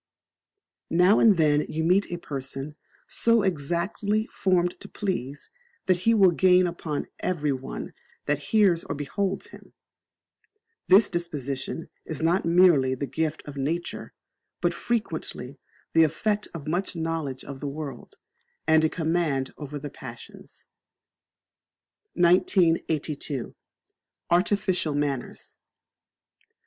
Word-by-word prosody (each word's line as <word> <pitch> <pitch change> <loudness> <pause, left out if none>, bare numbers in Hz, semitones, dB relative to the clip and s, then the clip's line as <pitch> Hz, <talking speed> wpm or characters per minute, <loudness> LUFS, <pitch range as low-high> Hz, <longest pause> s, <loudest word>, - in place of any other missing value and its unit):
Now 180 +5 +5
and 210 -5 +6
then 150 -2 +4
you 160 +1 -2
meet 185 +5 +3
a 175 - -2
person 140 -2 -6 0.3
so 230 -2 +2
exactly 190 +5 -1
formed 180 -4 0
to 200 - -11
please, 145 - -4 0.3
that 185 -1 +3
he 230 - +5
will 195 -4 +6
gain 180 +1 +4
upon 165 -4 -3
everyone 145 -7 -3 0.3
that 145 -1 0
hears 195 -6 +4
or - - -4
beholds 190 +7 -3
him: - - -15 1.1
this 195 +3 +7
disposition 150 -4 -4 0.2
is 155 -3 -5
not 170 +4 +1
merely 165 -7 +5
the 140 - -3
gift 155 +4 -2
of 145 -1 -8
nature, 160 +6 -3 0.4
but - - +1
frequently 160 - -3 0.3
the 165 - +6
effect 205 +7 0
of 160 -4 -8
much 180 +4 -2
knowledge 160 -5 -3
of 135 -1 -8
the 145 - -4
world, 140 -4 -7 0.5
and 160 0 +4
a 160 - +3
command 160 -5 -1
over 145 -1 -7
the 145 0 -7
passions. - - -11 1.5
1982. 165 - +1 0.8
Artificial 180 -3 +1
Manners. 145 -3 -3
165 Hz, 115 wpm, -26 LUFS, 145-185 Hz, 1.5 s, this